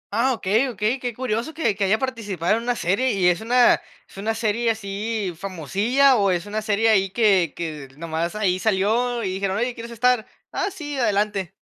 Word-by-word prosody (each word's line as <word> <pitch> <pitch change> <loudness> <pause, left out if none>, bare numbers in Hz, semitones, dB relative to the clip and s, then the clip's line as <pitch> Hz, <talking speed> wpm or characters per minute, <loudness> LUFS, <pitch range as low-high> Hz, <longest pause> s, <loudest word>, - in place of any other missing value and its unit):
Ah, 255 +3 +2
okey, 220 +5 +1
okey, 225 +3 -1
qué 245 -1 -3
curioso 245 +4 -3
que 235 -10 +1
que 200 -1 0
haya 210 +3 +3
participado 215 -8 -1
en - - -4
una 245 +1 -1
serie, 225 +7 +1
¿y 185 -3 +3
es 175 +4 0
una 245 +2 +4 0.3
es - - -18
una 220 +3 -2
serie 230 +1 0
así 210 -2 -3
famosilla?, 200 - +2
o 200 -1 +2
es 175 0 0
una 215 +1 -3
serie 215 +1 +1
ahí 195 -3 +3
que 195 -7 +2
que 155 -5 -5
nomás 165 +3 -3
ahí 185 -3 +1
salió 225 +4 +1
y 190 - -1
dijeron: 195 0 -1
"¿Oye 240 +2 -1
quieres 235 0 -9
estar? 240 -1 +1 0.2
Ah, 390 - -1
sí, 290 -5 -6
adelante". 200 -4 0
215 Hz, 195 wpm, -23 LUFS, 190-240 Hz, 0.3 s, una